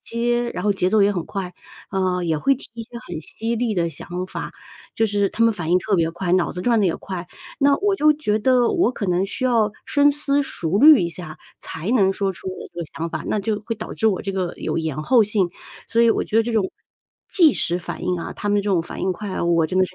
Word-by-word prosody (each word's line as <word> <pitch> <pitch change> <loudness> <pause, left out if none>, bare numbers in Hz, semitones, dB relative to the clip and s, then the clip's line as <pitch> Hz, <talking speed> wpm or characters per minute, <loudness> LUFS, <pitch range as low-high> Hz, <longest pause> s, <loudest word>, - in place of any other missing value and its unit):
接， 240 +1 -1
然 - - -4
后 205 - +3
节 185 -2 +1
奏 215 - +4
也 200 - +4
很 175 -4 -3
快， 185 -2 -5 0.4
呃， 185 -1 0
也 160 -2 0
会 275 - +3
提 - - -10
一 230 - -6
些 225 - -15 0.2
很 - - -5
犀 225 +9 -3
利 235 -1 0
的 170 -2 +1
想 175 +3 -5
法， - - -6 0.4
就 225 - +3
是 200 -1 +1
他 230 - +1
们 230 - +4
反 170 -5 -4
应 180 - +5
特 205 +3 -1
别 165 -3 +2
快， 175 +1 -3
脑 180 -2 +2
子 180 - -5
转 235 +2 +2
得 - - +2
也 170 - 0
快。 180 -2 -6 0.3
那 280 0 +5
我 405 0 +1
就 305 -5 +4
觉 250 -8 -1
得 250 0 +3
我 345 -8 +2
可 210 - -4
能 180 +1 +1
需 255 +6 -4
要 230 -4 +3
深 290 0 +4
思 285 -1 +1
熟 180 - -2
虑 300 0 +8
一 170 - 0
下 165 -2 -9 0.2
才 165 +7 -5
能 195 -6 +4
说 195 0 -1
出 185 +1 -8
我 185 - -7
的 170 - -4
想 165 +1 -2
法， - - -4
那 - - 0
就 210 +1 -2
会 230 - -1
导 - - -7
致 220 - 0
我 200 -4 +2
这 195 - -3
个 185 -2 -2
有 - - -3
延 160 -3 -3
后 240 +1 +5
性。 200 -3 +1 0.4
所 230 - +2
以 230 - +5
我 - - +1
觉 220 - -2
得 225 - +5
这 235 +1 -3
种 205 -4 +1 0.6
即时 295 - +3
反 175 - -7
应 180 -1 0
啊， - - -5
他 205 - -5
们 205 - +2
的 200 - +1
这 205 - -1
种 180 -4 +3
反 170 - -8
应 185 0 +1
快 200 +3 -7
啊， - - -3
我 170 -2 +3
真 185 +3 -1
的 185 - +5
是 185 - -15
200 Hz, 290 characters per minute, -22 LUFS, 180-230 Hz, 0.6 s, 虑